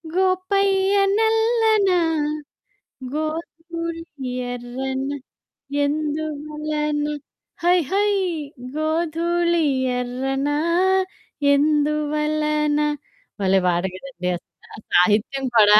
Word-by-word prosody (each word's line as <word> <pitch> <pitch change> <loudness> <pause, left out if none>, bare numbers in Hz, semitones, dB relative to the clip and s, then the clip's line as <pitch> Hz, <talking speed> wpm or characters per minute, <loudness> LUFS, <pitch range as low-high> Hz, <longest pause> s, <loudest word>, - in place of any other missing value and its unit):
గోపయ్య 385 +1 +2 0.2
నల్లన. 445 -2 +3 1.2
గోధూళి 330 +2 -4 0.5
ఎర్రనా. 265 +3 -3 0.7
ఎందువలన. 300 0 -2 0.6
High 355 +1 +5
high 410 +2 +3 0.6
గోధుళి 335 +2 +1 0.3
ఎర్రనా 270 +3 -1 1.0
ఎందువలన 300 0 +1 0.6
భలే 190 0 +4
పాట 175 0 +2
గదండి! 185 -3 -6
అసల 170 -2 -15 0.2
సాహిత్యం 215 +9 +3
కూడా 210 0 +8
305 Hz, 60 wpm, -22 LUFS, 270-340 Hz, 1.2 s, కూడా